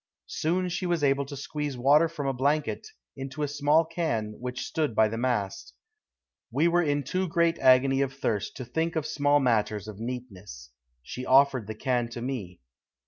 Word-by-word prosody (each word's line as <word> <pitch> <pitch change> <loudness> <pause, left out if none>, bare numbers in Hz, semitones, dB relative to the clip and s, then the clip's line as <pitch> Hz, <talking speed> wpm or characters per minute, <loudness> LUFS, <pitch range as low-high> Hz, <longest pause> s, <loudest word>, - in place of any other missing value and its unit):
Soon 180 +4 -1
she 180 +1 -2
was 170 -3 0
able 140 0 +2
to 140 0 -7
squeeze 145 -1 -4
water 145 +6 +4
from 150 -4 -5
a 135 - 0
blanket 145 - -1 0.3
into 135 +2 -5
a - - 0
small 145 +3 +2
can 155 -11 -2
which 125 0 -4
stood 150 -8 -2
by 110 0 +5
the 110 - -4
mast. 120 -6 -2 0.7
We 155 +5 +2
were 175 +1 +3
in 145 -3 0
too 185 +8 -1
great 170 0 +1
agony 135 +1 +5
of 135 -1 0
thirst 115 -7 -3
to 130 - -6
think 165 +6 -2
of 155 -2 -1
small 145 -1 +2
matters 110 -5 0
of 105 -1 -9
neatness. 105 - -7 0.3
She 125 - -7
offered 130 -4 +4
the 110 - -5
can 120 +1 -1
to 120 0 -7
me. 105 -10 -5
135 Hz, 185 wpm, -27 LUFS, 120-155 Hz, 0.7 s, by